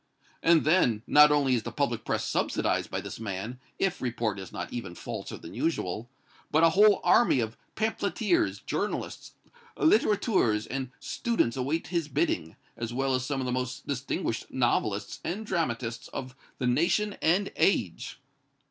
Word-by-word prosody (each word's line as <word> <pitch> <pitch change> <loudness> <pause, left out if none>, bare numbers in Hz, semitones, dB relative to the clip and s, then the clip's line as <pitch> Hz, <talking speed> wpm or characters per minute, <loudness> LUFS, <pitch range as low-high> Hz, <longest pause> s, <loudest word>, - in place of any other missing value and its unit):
"And, 165 -1 +4
then, 125 -10 +3
not 150 0 +7
only 140 -3 +3
is 120 - +2
the - - -6
public - - -1
press - - -1
subsidized - - 0
by - - -3
this - - -7
man, 110 +3 -5 0.2
if 195 -2 0
report 115 -5 -1
is 95 -2 -8
not - - -6
even 95 -8 -5
falser - - -6
than - - -11
usual, 120 - -2 0.4
but 160 +2 +3
a 165 - +6
whole 205 +4 +5
army 235 - +5
of 110 -1 -2 0.2
pamphleteers, 220 - 0
journalists, - - -3 0.4
littérateurs 200 - +3
and 130 -1 -3
students 230 - 0
await 140 +6 -2
his 170 -4 -1
bidding, 135 - -1 0.2
as 115 -1 -4
well 135 +2 0
as 130 -1 0
some 135 -1 -1
of - - -2
the 125 - -1
most 125 +1 -3
distinguished 130 -4 -3
novelists 110 -5 0
and 200 +6 -3
dramatists 120 - -2
of 130 0 -7 0.2
the 125 - -2
nation 185 +11 +2
and 185 +5 +2
age!" 105 - 0
130 Hz, 155 wpm, -28 LUFS, 115-170 Hz, 0.4 s, not